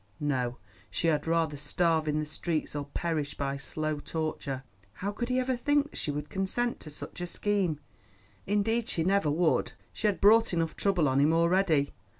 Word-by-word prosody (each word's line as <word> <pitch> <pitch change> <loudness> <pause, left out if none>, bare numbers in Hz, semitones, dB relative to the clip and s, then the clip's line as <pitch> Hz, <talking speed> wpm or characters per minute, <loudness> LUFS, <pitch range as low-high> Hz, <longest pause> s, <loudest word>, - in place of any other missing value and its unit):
No, 130 -5 -1 0.3
she 165 - +1
had 155 0 0
rather 165 -2 +1
starve 160 +2 +1
in 150 0 +1
the 155 - -1
streets 155 0 -3
or 145 -1 -2
perish 150 0 -2
by 140 -1 -1
slow 155 +2 -3
torture. 145 -4 -3 0.3
How 200 - -3
could 240 +4 -4
he 250 - +1
ever 255 0 +1
think 290 +4 +1
that - - -14
she - - -2
would 145 0 -3
consent 195 +7 -1
to 155 - -9
such 150 +4 -7
a 175 - -2
scheme? 190 -5 0 0.7
Indeed 225 +3 +1
she 165 - 0
never 190 -3 +2
would; 160 +2 +2 0.2
she 215 - 0
had 205 - +1
brought 225 +1 +6
enough 165 -1 0
trouble 190 -6 +2
on 135 +1 +2
him 145 +3 +5
already. 170 -3 +3
165 Hz, 185 wpm, -29 LUFS, 150-200 Hz, 0.7 s, brought